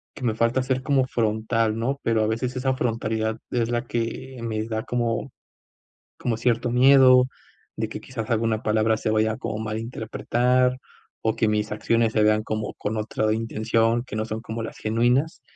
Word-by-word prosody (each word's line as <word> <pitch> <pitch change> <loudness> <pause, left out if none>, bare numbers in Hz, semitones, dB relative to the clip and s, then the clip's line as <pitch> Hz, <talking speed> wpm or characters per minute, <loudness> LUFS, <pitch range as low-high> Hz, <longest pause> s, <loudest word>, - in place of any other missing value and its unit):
que 135 - -9
me 115 - +1
falta 115 +3 +1
ser 130 0 -1
como 135 -1 +2
frontal, 110 -1 0
¿no? 135 +5 -1
Pero 110 -1 +1
a - - +1
veces 120 +4 -2
esa 130 +1 0
frontalidad 110 -2 -1
es 120 -2 0
la 120 +1 -1
que 120 +3 -4
me 110 -2 -2
da 110 -1 -2
como 120 +2 -2 0.9
como 115 -2 -1
cierto 120 0 +1
miedo, 130 0 +7 0.5
de - - -2
que - - -6
quizás 115 -4 -6
alguna 115 -1 +1
palabra 110 +1 +2
se 110 - -2
vaya 110 0 +1
como 110 - -4
a - - -4
malinterpretar, 120 +3 0 0.5
o 110 - +2
que 110 - +2
mis 105 0 0
acciones 115 +1 +1
se 110 - +2
vean 105 0 +3
como 110 -1 -3
con 105 +2 -3
otra 110 0 0
intención 115 +1 +1
que 130 - -9
no 110 0 -1
son 110 0 -4
como 115 0 -5
las 110 - -7
genuinas, 120 +8 +1
115 Hz, 180 wpm, -24 LUFS, 110-125 Hz, 0.9 s, miedo